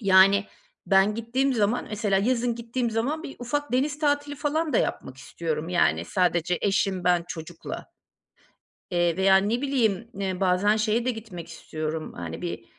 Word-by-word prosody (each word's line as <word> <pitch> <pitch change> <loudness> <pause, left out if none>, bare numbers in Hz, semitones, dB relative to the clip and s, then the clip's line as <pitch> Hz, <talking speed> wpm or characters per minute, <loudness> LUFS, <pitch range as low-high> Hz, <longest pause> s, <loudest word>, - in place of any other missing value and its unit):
Yani, 195 0 +5 0.4
ben 195 +2 +4
gittiğim 250 +4 0
zaman 220 +2 +1
mesela 205 -2 +1
yazın 240 +2 +1
gittiğim 235 +1 -2
zaman 270 +9 -1
bir 275 - -8
ufak 290 +3 -3
deniz 290 +4 +1
tatili 290 -1 0
falan 300 +1 -1
da - - +4
yapmak 130 - -2
istiyorum, 160 +3 -4
yani, 180 -1 +2
sadece 175 -2 +1
eşim, 195 -2 +1
ben, 175 -1 +3
çocukla. 165 0 -7 1.1
Eee, 175 0 +1
veya 190 0 +6
ne 215 +6 0
bileyim, 235 -6 +1
eee, 190 -2 -2
bazen 195 +4 +3
şeye 220 +2 +1
de 255 - +2
gitmek 210 -8 -8
istiyorum, 155 -1 -5
hani, - - -6
bir, 170 -10 -5
205 Hz, 155 wpm, -26 LUFS, 180-245 Hz, 1.1 s, veya